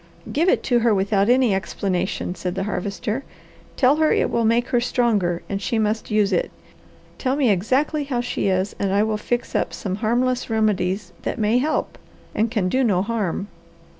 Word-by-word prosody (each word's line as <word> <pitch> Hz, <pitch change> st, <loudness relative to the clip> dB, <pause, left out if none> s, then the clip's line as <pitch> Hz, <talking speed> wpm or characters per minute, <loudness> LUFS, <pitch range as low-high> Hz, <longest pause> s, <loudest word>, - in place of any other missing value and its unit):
"Give 330 Hz, +6 st, +2 dB
it -, -, +2 dB
to 245 Hz, -2 st, +2 dB
her 230 Hz, -2 st, +3 dB
without 200 Hz, +2 st, +1 dB
any 250 Hz, -3 st, +4 dB
explanation," 190 Hz, -1 st, -2 dB
said 180 Hz, -1 st, -4 dB
the 195 Hz, -, -1 dB
Harvester. 210 Hz, +5 st, -3 dB, 0.5 s
"Tell 270 Hz, +2 st, +4 dB
her 315 Hz, 0 st, +3 dB
it -, -, +1 dB
will 230 Hz, -1 st, +1 dB
make 235 Hz, +2 st, +2 dB
her 245 Hz, -, +2 dB
stronger 210 Hz, -9 st, +1 dB
and 195 Hz, 0 st, -3 dB
she 210 Hz, +5 st, -1 dB
must 215 Hz, 0 st, -1 dB
use 210 Hz, -2 st, +2 dB
it. -, -, +1 dB, 0.7 s
Tell 260 Hz, 0 st, 0 dB
me 270 Hz, -6 st, +3 dB
exactly 265 Hz, -, +1 dB
how 260 Hz, -3 st, -2 dB
she 240 Hz, -4 st, -2 dB
is, 190 Hz, +1 st, 0 dB
and 195 Hz, -1 st, 0 dB
I 200 Hz, +2 st, +3 dB
will 215 Hz, -1 st, 0 dB
fix 240 Hz, +3 st, -3 dB
up -, -, -1 dB
some 190 Hz, -1 st, -4 dB
harmless 245 Hz, +3 st, 0 dB
remedies 200 Hz, -4 st, 0 dB
that -, -, -3 dB
may 220 Hz, +2 st, +2 dB
help, 305 Hz, +4 st, -1 dB, 0.3 s
and 220 Hz, +2 st, +1 dB
can 210 Hz, -5 st, 0 dB
do 260 Hz, +8 st, +1 dB
no 190 Hz, -6 st, +2 dB
harm." 205 Hz, -3 st, -2 dB
220 Hz, 190 wpm, -22 LUFS, 195-245 Hz, 0.7 s, any